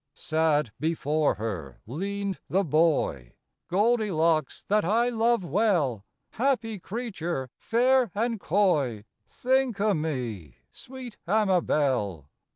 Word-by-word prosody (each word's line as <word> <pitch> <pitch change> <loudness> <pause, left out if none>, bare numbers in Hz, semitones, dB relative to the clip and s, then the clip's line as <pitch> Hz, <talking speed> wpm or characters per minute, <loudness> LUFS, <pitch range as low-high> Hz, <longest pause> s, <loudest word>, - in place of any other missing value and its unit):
Sad 155 -5 +1
before 155 0 +1
her 90 - -5
leaned 195 - -3
the 195 +2 +2
boy, 150 - +1 0.2
" - - -57
Goldilocks 185 -6 +1
that 210 +1 +2
I 230 +7 +2
love 230 -3 +1
well, 160 - +1 0.3
Happy 230 -4 0
creature 175 - -4
fair 250 +1 +2
and 230 +1 -1
coy, 150 - +1 0.2
Think 260 -3 0
o' 210 0 +3
me, 125 - -4 0.2
sweet 255 -3 -10
Amabel." 145 - +1
175 Hz, 105 wpm, -27 LUFS, 140-220 Hz, 0.3 s, o